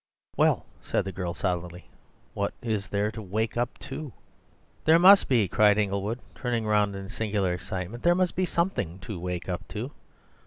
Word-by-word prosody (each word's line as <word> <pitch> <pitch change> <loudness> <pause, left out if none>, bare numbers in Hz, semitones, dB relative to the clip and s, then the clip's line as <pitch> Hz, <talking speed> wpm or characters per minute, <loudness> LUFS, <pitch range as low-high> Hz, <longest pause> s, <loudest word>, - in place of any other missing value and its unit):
"Well," - - +3 0.2
said - - -1
the 95 - -3
girl 90 -1 -4
solidly, 90 0 -3 0.5
"what 100 0 -2
is 110 -4 -1
there 105 +2 0
to 110 0 -7
wake 110 +3 -2
up 120 +1 -1
to?" 155 -4 -6 0.7
"There 160 +1 +7
must 195 +3 +8
be!" 115 -7 +3
cried 105 +2 +4
Inglewood, 100 +2 0 0.2
turning 120 -3 -2
round 105 -1 +2
in 95 0 -6
a - - -10
singular 100 -5 0
excitement—"there 95 - -1
must 180 -1 +1
be 185 0 +1
something 170 - -1
to 95 -1 -6
wake 90 0 -4
up 90 -2 -4
to! 115 +6 -5
105 Hz, 170 wpm, -27 LUFS, 95-120 Hz, 0.7 s, must